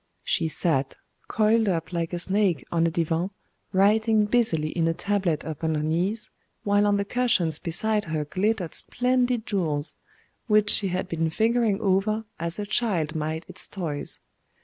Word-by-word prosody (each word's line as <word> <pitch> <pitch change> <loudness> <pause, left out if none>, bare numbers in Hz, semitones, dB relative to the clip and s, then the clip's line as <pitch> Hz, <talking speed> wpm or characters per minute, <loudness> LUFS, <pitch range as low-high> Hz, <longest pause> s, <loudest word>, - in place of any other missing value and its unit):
She - - +1
sat, 150 -4 0 0.3
coiled 220 0 +2
up 170 -1 -2
like 170 -1 -2
a 175 - -2
snake 190 - +1
on 170 0 +2
a - - +2
divan 165 +1 -1 0.4
writing 215 +3 +3
busily 205 -9 +2
in 165 0 0
a 165 - 0
tablet 195 -6 -1
upon 160 0 -2
her 150 - -1
knees 180 +8 -1 0.3
while 205 0 +3
on 205 0 +3
the 200 - -1
cushions 200 -9 +1
beside 210 +5 0
her 155 -2 -2
glittered 185 +2 -1
splendid 250 -2 +1
jewels, 160 -7 -1 0.5
which 210 -1 +4
she 200 - +1
had 180 0 -2
been 165 -2 -1
fingering 225 +2 +1
over 210 +3 +1
as 170 0 -3
a 205 - -3
child 195 -8 +1
might 155 +1 -3
its 185 0 -3
toys. 165 -7 -4
185 Hz, 160 wpm, -25 LUFS, 165-215 Hz, 0.5 s, which